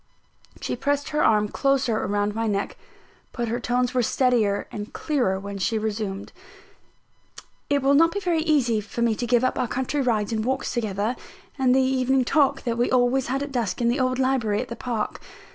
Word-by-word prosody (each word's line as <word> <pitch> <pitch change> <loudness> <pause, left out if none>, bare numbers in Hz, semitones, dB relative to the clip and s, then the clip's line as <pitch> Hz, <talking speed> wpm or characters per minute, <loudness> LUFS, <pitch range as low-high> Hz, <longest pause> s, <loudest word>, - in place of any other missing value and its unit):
She - - -2
pressed 285 +3 -1
her 300 0 +1
arm 210 -1 +3
closer 265 -2 +1
round 205 +1 0
my 225 +1 -1
neck; 200 -1 -2 0.6
but 240 -2 -2
her 235 +2 -1
tones 245 +1 0
were 250 - +2
steadier 230 -5 +1
and 210 0 -6
clearer 245 -11 0
when 200 0 -6
she 220 +4 0
resumed: 210 -2 -4 1.4
"It 285 -2 +1
will 275 +1 +4
not 330 +4 +5
be 405 - -2
very 350 -5 0
easy 270 -9 +2
for 225 +3 -4
me 230 -1 +3
to 240 +3 -3
give 245 0 +3
up 255 - 0
our 250 - 0
country 260 +5 -1
rides 225 -4 0
and 220 -1 -1
walks 265 +3 -1
together, 215 0 -1 0.4
and 255 -1 +4
the 265 - +4
evening 260 0 +2
talk 280 0 +2
that 235 -2 -2
we 240 - +2
always 255 +1 +2
had 270 +3 -1
at 285 - -6
dusk 235 -7 -2
in 235 -1 +2
the 245 +4 0
old 255 0 +1
library 255 -6 +1
at 250 - -4
the 235 - -5
park. 235 -4 -3
245 Hz, 200 wpm, -24 LUFS, 220-265 Hz, 1.4 s, not